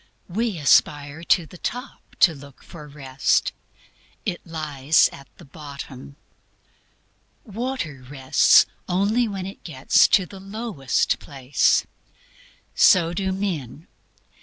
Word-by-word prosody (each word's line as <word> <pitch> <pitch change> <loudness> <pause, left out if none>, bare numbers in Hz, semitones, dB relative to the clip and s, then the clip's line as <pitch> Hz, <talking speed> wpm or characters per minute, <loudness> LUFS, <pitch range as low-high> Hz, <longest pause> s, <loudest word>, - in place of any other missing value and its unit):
We 215 +1 -2
aspire 145 +1 +2
to 170 - +3
the 175 +2 -14
top 250 +4 -7
to 170 - +6
look 140 -2 -14
for 150 -3 -12
Rest; 135 -2 0 0.7
it 175 - -3
lies 155 -2 +2
at 140 -1 -13
the - - -14
bottom. 140 -2 -10 1.3
Water 215 - -5
rests 135 -2 +4 0.2
only 205 +6 +1
when 195 -3 -5
it 195 - -10
gets 135 -5 +3
to 190 - +3
the 195 +2 -12
lowest 195 - -2
place. 135 -1 +1 0.9
So 170 -2 +4
do 190 +1 -2
men. 170 - -4
160 Hz, 110 wpm, -23 LUFS, 140-195 Hz, 1.3 s, to